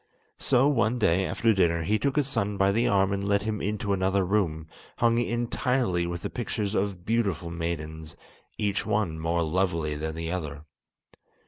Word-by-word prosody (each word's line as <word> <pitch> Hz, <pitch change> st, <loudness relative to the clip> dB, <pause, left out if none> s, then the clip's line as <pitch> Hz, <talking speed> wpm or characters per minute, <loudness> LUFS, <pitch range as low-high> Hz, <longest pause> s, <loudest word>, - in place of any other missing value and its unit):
So 130 Hz, +1 st, +4 dB
one 125 Hz, -4 st, +2 dB
day, 95 Hz, -4 st, +2 dB
after 115 Hz, -1 st, +2 dB
dinner, 85 Hz, -4 st, +2 dB
he 105 Hz, +6 st, +1 dB
took 140 Hz, -1 st, 0 dB
his 145 Hz, -2 st, +2 dB
son 105 Hz, -7 st, -1 dB
by 95 Hz, 0 st, +3 dB
the 115 Hz, +4 st, +2 dB
arm 95 Hz, -1 st, +3 dB
and 100 Hz, 0 st, -2 dB
led 100 Hz, -1 st, +2 dB
him 110 Hz, -1 st, -2 dB
into 105 Hz, 0 st, -1 dB
another 95 Hz, 0 st, +1 dB
room, 90 Hz, -5 st, 0 dB, 0.3 s
hung 115 Hz, 0 st, +3 dB
entirely 120 Hz, -5 st, 0 dB
with 85 Hz, 0 st, -5 dB
the -, -, -2 dB
pictures 110 Hz, -4 st, -3 dB
of 95 Hz, -3 st, -2 dB
beautiful 100 Hz, -7 st, 0 dB
maidens, 80 Hz, -2 st, -5 dB, 0.4 s
each 100 Hz, -1 st, 0 dB
one 100 Hz, -6 st, -1 dB
more 85 Hz, +1 st, 0 dB
lovely 85 Hz, -2 st, 0 dB
than 80 Hz, +1 st, -4 dB
the 80 Hz, 0 st, -4 dB
other. 75 Hz, -5 st, -5 dB
95 Hz, 175 wpm, -27 LUFS, 85-110 Hz, 0.4 s, So